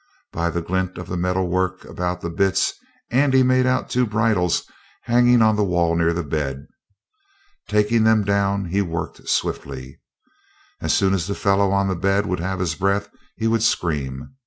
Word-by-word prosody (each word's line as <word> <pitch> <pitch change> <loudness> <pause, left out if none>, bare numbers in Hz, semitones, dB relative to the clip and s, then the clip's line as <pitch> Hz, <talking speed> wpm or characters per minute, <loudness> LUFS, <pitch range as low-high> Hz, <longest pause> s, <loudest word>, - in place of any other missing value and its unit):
By 85 +1 -1
the 85 0 -3
glint 95 +1 -2
of 90 - -6
the 90 - -4
metal 90 +1 0
work 95 +1 -1
about 90 0 -4
the 85 - -4
bits 95 +1 +1 0.4
Andy 130 +1 +4
made 130 0 +3
out 130 - +1
two 125 -1 +1
bridles 105 -5 +1 0.4
hanging 120 0 +4
on 110 -1 +4
the 105 - +1
wall 85 -3 +1
near 85 0 +2
the 85 0 -2
bed. 70 -2 -3 1.0
Taking 105 +2 +2
them 110 -1 +4
down, 100 0 0
he 95 +4 0
worked 85 -4 -5
swiftly. 65 -1 -3 0.8
As - - 0
soon 95 -1 +2
as 90 -2 -1
the 100 - -2
fellow 100 0 +2
on 100 0 +1
the 95 - -1
bed 100 +3 +1
would 90 -3 -2
have 95 +2 -2
his 90 -3 -1
breath 100 +4 0 0.3
he 115 - -4
would 115 0 +2
scream. 75 - -1
95 Hz, 180 wpm, -22 LUFS, 85-105 Hz, 1.0 s, Andy